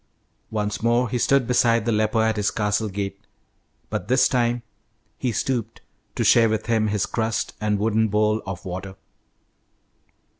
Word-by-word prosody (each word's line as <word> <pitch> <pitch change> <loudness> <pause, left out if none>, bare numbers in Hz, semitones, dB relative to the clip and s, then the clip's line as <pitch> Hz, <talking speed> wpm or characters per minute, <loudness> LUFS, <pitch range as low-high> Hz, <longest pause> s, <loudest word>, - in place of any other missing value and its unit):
Once 105 -1 -2
more 120 +2 +2
he 125 - -1
stood 135 +1 +3
beside 115 -2 +2
the 120 - +1
leper 110 +1 +1
at 110 0 +1
his 105 -1 +1
castle 105 0 -1
gate, 100 0 -4 0.7
but - - -3
this 130 +1 +4
time 120 -1 0 0.6
he 125 - 0
stooped 115 0 -2 0.4
to - - 0
share 115 -2 +5
with 110 0 -1
him 110 -2 +1
his 105 -2 0
crust 115 0 -2
and 105 -1 +1
wooden 110 +1 +1
bowl 105 +1 +1
of 95 0 -6
water. 95 +1 -6
110 Hz, 155 wpm, -23 LUFS, 105-115 Hz, 0.7 s, share